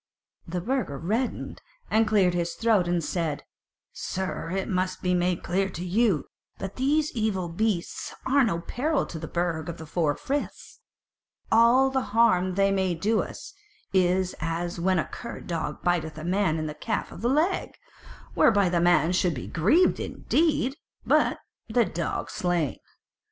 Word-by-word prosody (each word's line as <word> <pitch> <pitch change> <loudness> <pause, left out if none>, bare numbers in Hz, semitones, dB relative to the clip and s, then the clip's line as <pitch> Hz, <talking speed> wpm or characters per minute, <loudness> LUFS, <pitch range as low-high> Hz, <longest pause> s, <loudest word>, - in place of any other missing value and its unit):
The 175 +1 -3
Burgher 240 - -1
reddened 220 - -2 0.3
and 220 0 +4
cleared 195 -5 +3
his 170 -1 -1
throat 220 -6 +2
and 175 -1 0
said: 155 -3 -2 0.5
"Sir, 185 -3 -4
it 190 +2 -2
must 185 0 -1
be 180 0 +2
made 180 0 0
clear 190 +2 0
to 175 -1 -6
you 195 - +2 0.3
that 195 0 -6
these 295 +4 +1
evil 210 -6 -1
beasts 185 0 -2
are 275 +1 +4
no 170 -8 0
peril 290 - -1
to 160 - -7
the 160 - -6
Burg 170 -2 -2
of 170 - -6
the 160 - -8
Four 150 -2 0
Friths; 285 +1 -4 0.7
all 240 +4 +5
the 265 0 +1 0.2
harm 185 -6 +4
they 195 0 +3
may 190 -2 +1
do 215 +7 +1
us, - - -8 0.4
is 185 0 +2
as 170 +2 -3
when 185 +2 +2
a 155 - +1
cur 235 - -8
dog 160 -3 -4
biteth 160 -3 0
a 155 - -6
man 180 -2 +1
in 155 - -2
the 150 - -4
calf 220 +7 -3
of - - -10
the 240 - +1
leg; 315 +8 0 0.6
whereby 200 -4 +4
the 170 -1 +1
man 175 -1 +4
shall 180 0 +2
be 140 -7 -4
grieved 230 - +3
indeed, 295 -4 0 0.3
but - - +3 0.3
the 235 +1 +3
dog 170 -3 -3
slain. 175 -6 -1
185 Hz, 165 wpm, -26 LUFS, 170-225 Hz, 0.7 s, all